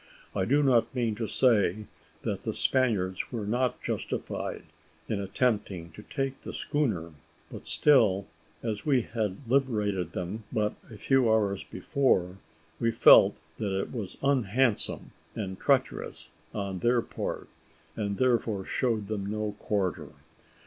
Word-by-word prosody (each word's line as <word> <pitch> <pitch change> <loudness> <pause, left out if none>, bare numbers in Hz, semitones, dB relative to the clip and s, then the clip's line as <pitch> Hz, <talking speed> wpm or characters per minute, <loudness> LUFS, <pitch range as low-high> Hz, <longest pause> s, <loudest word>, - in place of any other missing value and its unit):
I 95 -2 +1
do 145 +6 +3
not 130 -1 +3
mean 120 -3 0
to 115 -1 -2
say 105 -5 +2 0.4
that - - -2
the - - -3
Spaniards 105 -8 +1
were 115 -4 -3
not 125 +4 -1
justified - - -4 0.4
in 105 -2 -2
attempting 100 -5 -1
to 105 - -11
take 135 +3 -4
the - - -7
schooner; 105 - -1 0.4
but - - -9
still, 110 -10 +5 0.4
as 110 -3 -3
we 135 -5 +2
had 110 +1 -4
liberated 105 - 0
them 95 +5 -4
but 105 -1 0 0.2
a 110 - -10
few 130 -1 +3
hours 100 -3 +1
before, 95 - 0 0.4
we 115 - +2
felt 115 - +7 0.2
that 100 -3 -1
it - - -4
was 110 -7 -5
unhandsome 130 -3 +1 0.2
and 95 -3 -5
treacherous - - 0 0.2
on 100 -3 -4
their 120 +3 +2
part, - - -5 0.5
and 100 -2 -2
therefore 115 -6 +1
showed 115 -5 0
them 100 -2 -3
no 105 -1 -3
quarter. 100 -4 -2
110 Hz, 135 wpm, -28 LUFS, 100-125 Hz, 0.5 s, felt